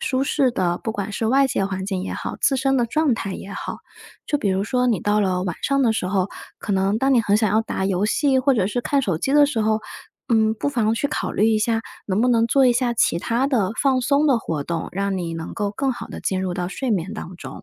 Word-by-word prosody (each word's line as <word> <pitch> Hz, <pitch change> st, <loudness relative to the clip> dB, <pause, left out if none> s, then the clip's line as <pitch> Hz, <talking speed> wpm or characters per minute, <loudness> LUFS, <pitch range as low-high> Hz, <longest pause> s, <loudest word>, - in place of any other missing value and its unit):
舒 260 Hz, +1 st, 0 dB
适 275 Hz, -2 st, +2 dB
的 180 Hz, -6 st, -1 dB
不 220 Hz, -, -4 dB
管 205 Hz, 0 st, -4 dB
是 225 Hz, -, -2 dB
外 270 Hz, +3 st, +4 dB
界 195 Hz, -6 st, -1 dB
环 190 Hz, -1 st, -4 dB
境 190 Hz, -2 st, -3 dB
也 -, -, -4 dB
好， -, -, -5 dB
自 270 Hz, -, +3 dB
身 270 Hz, 0 st, +1 dB
的 235 Hz, -, +1 dB
状 305 Hz, +2 st, +1 dB
态 195 Hz, -3 st, -4 dB
也 195 Hz, -, -8 dB
好。 -, -, -5 dB, 0.5 s
就 295 Hz, -, 0 dB
比 205 Hz, -, -1 dB
如 190 Hz, +1 st, 0 dB
说 250 Hz, +2 st, 0 dB
你 220 Hz, -8 st, +1 dB
到 210 Hz, +1 st, +1 dB
了 185 Hz, -2 st, 0 dB
晚 180 Hz, -3 st, -2 dB
上 275 Hz, -1 st, +2 dB
的 230 Hz, -3 st, +3 dB
时 200 Hz, -4 st, -2 dB
候， 190 Hz, 0 st, 0 dB, 0.3 s
可 205 Hz, -, -3 dB
能 195 Hz, +2 st, +1 dB
当 270 Hz, +2 st, +2 dB
你 240 Hz, -, +5 dB
很 205 Hz, -1 st, +2 dB
想 215 Hz, -2 st, +1 dB
要 220 Hz, +2 st, +3 dB
打 190 Hz, -3 st, -3 dB
游 195 Hz, +1 st, +1 dB
戏 270 Hz, +3 st, +2 dB
或 260 Hz, +1 st, +3 dB
者 190 Hz, -5 st, +1 dB
是 245 Hz, +4 st, -1 dB
看 280 Hz, +2 st, 0 dB
手 175 Hz, -8 st, -1 dB
机 270 Hz, -, -1 dB
的 295 Hz, -, +7 dB
时 255 Hz, -6 st, -1 dB
候， 215 Hz, 0 st, +1 dB, 0.5 s
嗯， 220 Hz, -2 st, +3 dB
不 285 Hz, -, -2 dB
妨 225 Hz, -5 st, +1 dB
去 285 Hz, -, 0 dB
考 -, -, -2 dB
虑 215 Hz, +3 st, +3 dB
一 220 Hz, -, +3 dB
下， 225 Hz, +1 st, +1 dB, 0.2 s
能 200 Hz, +2 st, 0 dB
不 245 Hz, -, +3 dB
能 230 Hz, -1 st, +3 dB
做 270 Hz, 0 st, +4 dB
一 245 Hz, -, +5 dB
下 240 Hz, 0 st, +1 dB
其 205 Hz, -, +2 dB
他 240 Hz, +7 st, 0 dB
的 220 Hz, -9 st, +1 dB
放 265 Hz, -2 st, +2 dB
松 285 Hz, +3 st, +2 dB
的 265 Hz, -5 st, +4 dB
活 155 Hz, -6 st, -3 dB
动？ 170 Hz, -1 st, -3 dB
让 195 Hz, 0 st, -1 dB
你 170 Hz, -2 st, -3 dB
能 165 Hz, 0 st, -6 dB
够 205 Hz, -2 st, -1 dB
更 265 Hz, +6 st, -1 dB
好 -, -, -7 dB
地 -, -, -8 dB
进 190 Hz, -1 st, -1 dB
入 185 Hz, -1 st, -2 dB
到 175 Hz, -1 st, -3 dB
睡 255 Hz, +5 st, -3 dB
眠 195 Hz, +1 st, -1 dB
当 185 Hz, -3 st, -7 dB
中。 -, -, -9 dB
220 Hz, 295 characters per minute, -22 LUFS, 190-255 Hz, 0.5 s, 的